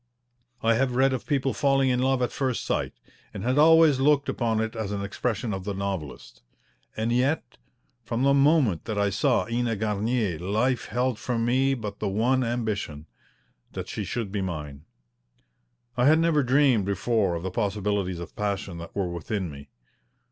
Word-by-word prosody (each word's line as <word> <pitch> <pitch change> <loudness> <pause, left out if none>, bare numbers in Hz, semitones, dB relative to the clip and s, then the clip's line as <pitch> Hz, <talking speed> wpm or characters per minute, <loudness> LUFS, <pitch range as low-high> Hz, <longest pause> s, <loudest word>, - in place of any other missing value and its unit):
I 115 +1 +4
have 125 +1 0
read 135 +1 +3
of 130 - -4
people 135 -3 0
falling 135 -1 +2
in 125 - +1
love 130 0 +1
at 125 - -1
first 130 -3 -2
sight, - - -1 0.4
and - - -5
had 130 +4 +1
always 160 -3 +6
looked 140 +1 +3
upon 115 -3 0
it 110 +1 -2
as 110 -3 -3
an 100 -1 -3
expression 110 +2 -2
of 95 -1 -4
the 100 0 -4
novelist. 95 -7 -5 0.6
And 110 +2 -1
yet 130 +6 0 0.5
from 115 +2 -2
the 140 0 +4
moment 140 - +3
that 110 - -3
I 100 -1 +1
saw 120 +6 +2
Ena 120 -1 -1
Garnier 105 -3 -1
life 110 +7 0
held 125 -2 -1
for 125 -2 -2
me 130 +4 +2
but 105 -4 -6
the 105 - -1
one 120 +6 +1
ambition 110 -11 -3 0.7
that - - -6
she - - -4
should 115 -5 -4
be 100 -1 -2
mine. 75 -5 -5 1.1
I 125 +1 +3
had 155 +2 +6
never 165 -2 +3
dreamed 130 -5 +3
before 100 -1 0
of 85 - -5
the 95 - -3
possibilities 100 -3 -1
of 85 - -9
passion 100 -4 -3
that 85 - -10
were 95 -3 -1
within 90 +1 -3
me. 70 0 -11
115 Hz, 175 wpm, -26 LUFS, 100-130 Hz, 1.1 s, always